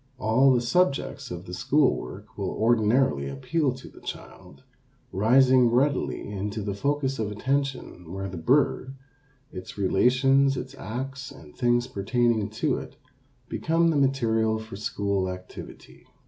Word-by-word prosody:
All 130 +4 +4
the 125 -2 +3
subjects 140 -1 0
of 90 -1 -7
school 135 +8 +3
work - - -9
will - - -3
ordinarily 110 - +2
appeal 135 - -1
to 130 - -11
the - - -15
child, - - -10 0.5
rising 125 +4 +4
readily 130 +3 0
into 105 +1 -4
the 100 0 -2
focus 135 +4 -1
of 110 -2 -1
attention 130 - -3
where 95 +1 -4
the 95 - -7
bird, 130 - +1 0.6
its 90 +2 -9
relations, 135 +7 +3
its - - -6
acts, 130 +5 -6
and 75 -2 -14
things 120 -1 +2
pertaining 120 -1 0
to 110 - -1
it, - - -11 0.5
become 165 +1 +1
the - - -1
material 115 -6 +2
for 110 -2 -8
school 100 -2 -1
activity. 90 0 -10
120 Hz, 135 wpm, -26 LUFS, 100-135 Hz, 0.6 s, All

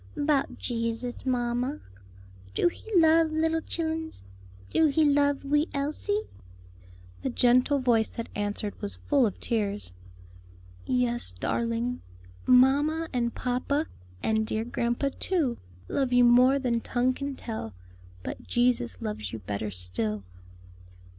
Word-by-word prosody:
"'Bout 290 -1 +1
Jesus, 230 +1 -3
mamma. 245 +2 0 0.8
Do - - +3
He - - -14 0.2
love 320 0 +5
little 320 +1 +1
chillens? 320 - -3 0.5
do 320 - +4
he 305 +2 +3
love 285 -1 +3
wee 295 +3 +2
Elsie?" 310 +9 -1 1.0
The - - -1
gentle 250 +3 +3
voice 240 -4 +2
that 230 - -6
answered 205 0 -3
was 205 -1 +3
full 275 -5 +2
of 200 - -6
tears. 205 - -1 0.9
"Yes, 120 -6 +1
darling, 230 - -2 0.5
mamma 290 +6 +4
and 235 -2 -1
papa, 260 +4 -1 0.4
and 220 0 +1
dear 220 +1 -1
grandpa 240 +3 -1
too, 310 -11 0 0.3
love 265 -2 0
you 245 0 +5
more 250 +3 +6
than 240 -4 0
tongue 250 +2 +1
can 280 +1 -4
tell, 220 - -6 0.5
but - - -5
Jesus 240 - +1
loves 105 -2 -4
you 115 - -5
better 105 0 -4
still." 100 +3 -3
245 Hz, 125 wpm, -27 LUFS, 220-285 Hz, 1.0 s, more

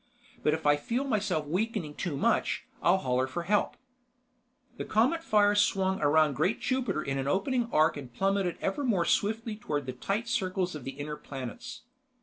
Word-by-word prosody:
But 150 - +2
if 160 - -8
I 145 0 +5
feel 235 - -2
myself 210 - 0
weakening 185 -1 -2
too 155 -3 -3
much, - - +1 0.2
I'll 175 +2 +4
holler 130 -5 0
for 150 +6 -4
help." 205 +4 +1 1.0
The - - -3
Cometfire 215 -4 +3
swung 190 -2 +2
around 150 0 +4
great 160 - 0
Jupiter 255 - -1
in 135 0 -2
an 135 - -2
opening 235 - 0
arc 155 0 +3
and 130 -4 -8
plummeted 195 +4 0
ever 195 +9 -1
more 200 -10 +2
swiftly 220 +1 0
toward 150 -9 -3
the 130 - -4
tight 200 - -2
circles 185 -6 -1
of 150 -5 -8
the 135 - -4
inner 150 +1 -5
planets. 140 - -8
185 Hz, 170 wpm, -29 LUFS, 150-215 Hz, 1.0 s, I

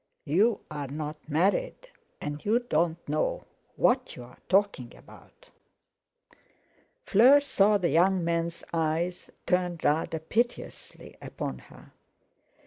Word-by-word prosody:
"You're 200 +9 +2
not 150 +1 -5
married, 200 - 0 0.3
and 145 0 -6
you 215 +3 +2
don't 170 -8 -1
know - - -1 0.3
what 255 +1 +1
you're 125 0 -12
talking 190 -11 +1
about." - - -18 1.5
Fleur 255 +8 +6
saw 210 -7 +3
the 180 -3 0
young 185 +2 +3
man's 170 0 -2
eyes 165 +2 -1 0.2
turn 180 -1 0
rather 160 +2 +1
piteously 230 +10 -4
upon - - -6
her. - - -17
175 Hz, 105 wpm, -27 LUFS, 155-215 Hz, 1.5 s, Fleur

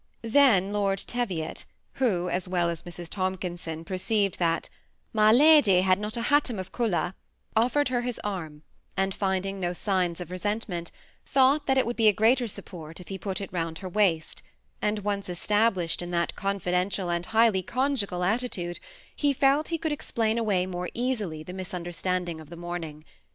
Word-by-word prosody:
Then 225 -6 +4
Lord 200 -1 +1
TevioC^ 195 -8 -3 0.4
who, 185 -8 +2
as 180 +1 -2
Well 175 -2 +1
ae - - -1
Mrs. 175 +1 -8
Tomkinseci, 175 -3 -3
perceived 195 +1 0
that 165 -1 +1 0.2
'< - - -43
My 215 -1 +5
]a,dj 250 - +6
had 185 0 +3
not 210 +3 -3
a - - -1
hatom 285 -4 +2
of 185 0 -6
eolor," 205 -6 0 0.4
offered 250 +5 +3
her 245 -1 +1
his 245 -1 -4
arm, 160 -7 -5 0.3
and, 195 0 +1
finding 195 0 -1
no 175 -1 -1
signs 180 -2 0
of 180 -1 -7
resentment, 185 -2 -3 0.3
thought 275 +2 +3
that 265 -1 +3
it 260 - +4
would 240 +1 -3
be 225 -2 +4
a 210 - +7
greater 235 +4 +3
support 165 -5 -8
if 180 - -12
he 195 -1 -5
put 190 0 -3
it 195 -2 -7
round 165 -2 -2
her 185 0 -6
waist; 175 -5 +1 0.4
«nd 210 -1 0
once 200 -1 -2
established 190 -1 +1
in 175 - -5
that 170 -1 0
confidential 185 -1 -1
and 170 +1 -2
highly 220 -4 +4
conjugal 220 -5 -1
attitude, 185 -4 -1 0.4
he 290 -1 +2
felt 275 +3 +3
he 335 - -1
could 320 -1 -2
explain 230 -6 0
away 200 -5 +1
more 180 -1 -4
easily 215 -11 -2
the 180 - -8
misunderstanding 180 -2 -3
of 155 - -14
the 170 - -9
morning. 165 -3 -6
190 Hz, 175 wpm, -27 LUFS, 175-225 Hz, 0.4 s, a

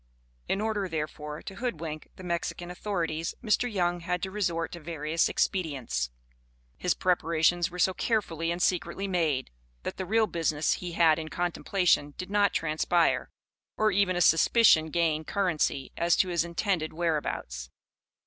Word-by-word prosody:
In 195 - +1
order, 210 -3 -1
therefore, 150 -1 -5
to 195 - -8
hoodwink 165 -10 -4
the 185 - -11
Mexican 175 0 -3
authorities, 170 -4 -2
Mr. 235 +2 +1
Young 175 -3 0
had 175 +1 -2
to 190 - -2
resort 170 -5 -1
to 170 - -7
various 160 0 0
expedients. 135 - -1 0.7
His 180 - 0
preparations 175 -1 +2
were 180 - -9
so 185 +1 +3
carefully 170 -7 -1
and 170 +1 -1
secretly 185 +2 0
made, 160 -8 0 0.3
that - - -4
the 185 - -3
real 220 +3 +3
business 160 -5 0
he 175 -1 -5
had 165 -1 +4
in 155 -1 -5
contemplation 175 -3 +1
did 185 +1 -6
not 205 -1 +3
transpire, 165 +2 +1 0.5
or 215 0 +3
even 195 -1 +2
a 175 - 0
suspicion 165 0 +5
gain 160 -1 +1
currency 155 -7 0
as 170 0 +3
to 185 - +2
his 170 -2 +1
intended 170 -1 -1
whereabouts. 150 - -2
170 Hz, 150 wpm, -28 LUFS, 160-185 Hz, 0.7 s, suspicion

